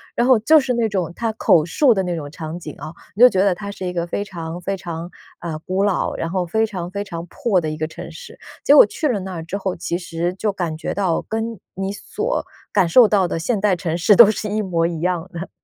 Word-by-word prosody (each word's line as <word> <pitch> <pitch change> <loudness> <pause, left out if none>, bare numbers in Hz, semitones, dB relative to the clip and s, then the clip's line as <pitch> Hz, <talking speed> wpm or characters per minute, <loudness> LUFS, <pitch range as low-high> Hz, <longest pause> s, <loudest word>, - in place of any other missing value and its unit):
然 240 - +2
后 255 -3 +6
就 305 +9 +5
是 260 -2 -1
那 235 -2 +1
种 185 -5 -2
他 230 -1 -1
口 180 -7 +3
述 260 - +3
的 190 -2 0
那 180 - -2
种 145 -3 -6
场 160 +3 -7
景 155 -3 -8
啊， 155 - -8 0.2
你 225 - -2
就 250 - +11
觉 190 - -1
得 195 -2 +3
它 200 +2 -6
是 195 - -9
一 - - -2
个 170 -1 -1
非 175 +4 -3
常， 170 -3 -7
非 195 +2 -3
常， 170 -1 -6 0.3
啊， 165 -2 -5
古 185 +5 -2
老， 200 -2 0
然 165 - -3
后 185 0 -1
非 220 +6 +1
常， 180 -4 -6
非 200 +1 -3
常 170 -4 -7
破 205 - 0
的 160 - -3
一 155 - -5
个 155 0 -2
城 - - -9
市。 485 - -12 0.3
结 285 - +6
果 - - +9
去 300 +9 -2
了 240 -7 0
那 190 0 -6
儿 165 -2 -5
之 180 +4 -4
后， 190 -2 -3
其 170 0 -3
实 175 -1 -3
就 210 +2 -1
感 175 -5 -3
觉 - - -4
到 190 -5 0
跟 225 0 -3
你 195 +1 -3
所 435 - -3 0.3
感 175 - +3
受 235 +7 +7
到 200 -3 +2
的 165 - -3
现 210 +5 -1
代 200 -2 +2
城 170 -2 -3
市 195 +4 +4
都 230 -1 +9
是 215 0 -2
一 210 +1 -1
模 170 -5 0
一 170 -2 -2
样 175 -1 -1
的。 170 +2 -6
185 Hz, 285 characters per minute, -20 LUFS, 170-210 Hz, 0.3 s, 就